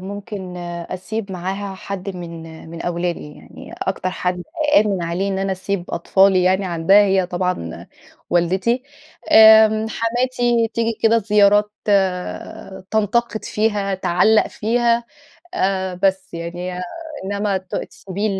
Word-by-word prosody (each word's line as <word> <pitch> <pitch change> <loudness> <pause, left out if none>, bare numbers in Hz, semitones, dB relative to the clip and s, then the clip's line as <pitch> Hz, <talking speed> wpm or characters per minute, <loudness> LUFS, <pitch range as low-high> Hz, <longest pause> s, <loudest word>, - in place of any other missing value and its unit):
ممكن 195 -1 -7
آآ، 175 0 -6
أسيب 195 +2 -5
معاها 190 +2 -4
حد 190 0 -6
من 165 -2 -8
آآ، 160 0 -12
من 165 +1 -8
أولادي 170 -3 -3
يعني، - - -13
أكتر 190 -1 -2
حد 180 -1 -2 0.3
أأمن 200 -4 +3
عليه 175 +4 -1
إن 190 - -2
أنا 195 0 -1
أسيب 190 -1 -3
أطفالي 190 +2 +3
يعني 190 +2 +2
عندها 180 +4 +4
هي 190 -2 +2
طبعًا 180 - -3 0.4
والدتي، 190 +8 +1 0.5
آمم 220 0 +7
حماتي 240 0 0
تيجي 230 0 0
كده 230 +1 +5
زيارات 210 0 +3 0.2
آآ، 190 -1 -1
تنتقد 220 +1 0
فيها، 205 -2 0
تعلَّق 190 +4 +3
فيها، 235 +1 +1 0.5
آآ، 190 - 0
بس 190 -1 0
يعني، 175 +2 -5
هي 180 0 -5 0.4
إنما 200 0 -1
ت 185 -1 -11
تسيبي 200 +2 -4
195 Hz, 130 wpm, -20 LUFS, 180-215 Hz, 0.5 s, آمم